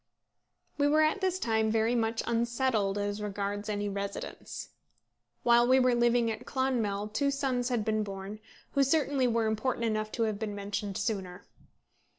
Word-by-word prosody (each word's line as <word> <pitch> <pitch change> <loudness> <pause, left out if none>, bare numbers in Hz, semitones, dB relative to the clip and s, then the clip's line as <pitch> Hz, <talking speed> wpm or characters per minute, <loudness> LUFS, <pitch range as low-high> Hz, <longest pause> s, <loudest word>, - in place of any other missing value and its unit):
We 285 - +4
were 305 +2 +4
at 315 +6 +1
this 375 -1 +1
time 220 -8 +1
very 225 +2 +2
much 225 -1 0
unsettled 235 -3 0
as 205 0 -2
regards 205 0 -3
any 205 -1 -1
residence. 200 0 -5 0.7
While 240 0 +5
we 260 +1 +5
were 255 -1 +4
living 240 -1 +3
at 220 - -6
Clonmel 225 -6 -1
two 280 +7 +1
sons 265 -3 0
had 235 -4 0
been 215 0 +1
born, 200 0 -6 0.3
who 280 - +2
certainly 275 -2 +2
were 230 -1 +1
important 225 +2 0
enough 215 -1 -1
to 230 - 0
have 215 -2 -1
been 210 -2 -3
mentioned 200 0 -3
sooner. 190 -5 -3
225 Hz, 160 wpm, -30 LUFS, 205-250 Hz, 0.7 s, While